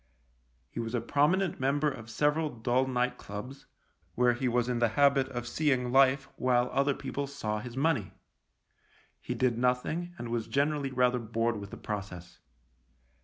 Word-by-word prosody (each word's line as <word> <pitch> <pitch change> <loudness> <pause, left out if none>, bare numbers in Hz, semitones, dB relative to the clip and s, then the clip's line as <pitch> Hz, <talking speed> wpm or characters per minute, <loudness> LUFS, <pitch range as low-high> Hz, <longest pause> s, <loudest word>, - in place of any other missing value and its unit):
He - - -6
was 115 +1 -3
a - - +2
prominent 160 +9 +1
member 140 +3 +1
of 120 -6 -5
several 150 +6 +1
dull 125 +1 0
night 125 -1 -1
clubs, 125 +7 -8 0.5
where 125 0 +4
he 125 +2 -2
was 120 0 +1
in 125 -1 -1
the 120 -1 +3
habit 140 -2 +4
of 120 -2 -5
seeing 125 -2 +1
life 135 +1 +4
while 125 -1 +2
other 140 0 +2
people 140 0 -4
saw 110 -7 -3
his 120 +3 -8
money. 140 -8 +1 1.1
He - - -4
did 120 -3 +1
nothing 155 +8 0
and 120 - -6
was 115 -1 -2
generally 145 0 0
rather 125 -1 +2
bored 115 0 -1
with 100 -1 -8
the - - -9
process. 95 -4 -6
125 Hz, 165 wpm, -30 LUFS, 120-140 Hz, 1.1 s, where